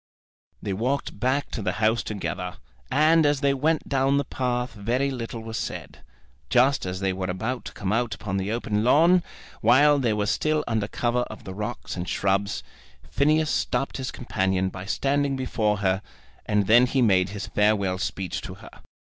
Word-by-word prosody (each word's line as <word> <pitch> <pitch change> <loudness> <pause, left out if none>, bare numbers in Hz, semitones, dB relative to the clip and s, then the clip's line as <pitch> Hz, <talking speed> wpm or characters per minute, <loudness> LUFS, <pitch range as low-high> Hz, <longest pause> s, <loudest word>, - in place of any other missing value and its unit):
They 100 - -2
walked 125 +3 -2
back 130 +5 0
to 115 - -4
the 95 -3 -1
house 110 0 +2
together, 95 -3 -4 0.3
and 155 +3 +4
as 145 -2 +2
they 140 -1 +3
went 155 +4 0
down 135 0 +2
the 140 - +2
path 125 -1 -2
very 120 +6 -1
little 115 -2 -5
was 110 0 -5
said. - - -6 0.5
Just 130 -3 +3
as 90 +1 -4
they 95 -1 +1
were 95 0 -3
about 110 +7 -3
to - - -6
come 100 0 -2
out 115 0 0
upon 100 -2 -4
the 95 +2 -2
open 110 -2 -1
lawn, 165 +8 +5 0.4
while 145 +6 +5
they 120 -5 +1
were 105 -1 0
still 155 +8 +1
under 110 -3 -1
cover 120 +2 0
of 110 - -10
the 95 - -7
rocks 105 +4 -5
and 90 -1 -4
shrubs, 100 +1 0 0.5
Phineas 155 +2 +2
stopped 125 +2 -1
his 130 -1 -4
companion 95 -5 -1
by 95 0 -8
standing 140 +4 0
before 110 -5 0
her, 95 +1 +2 0.5
and 105 -1 +2
then 120 +5 +6
he 130 0 +2
made 95 -4 +3
his 105 0 -5
farewell 100 -3 +1
speech 90 0 -3
to - - -8
her. - - -13
115 Hz, 180 wpm, -25 LUFS, 100-135 Hz, 0.5 s, then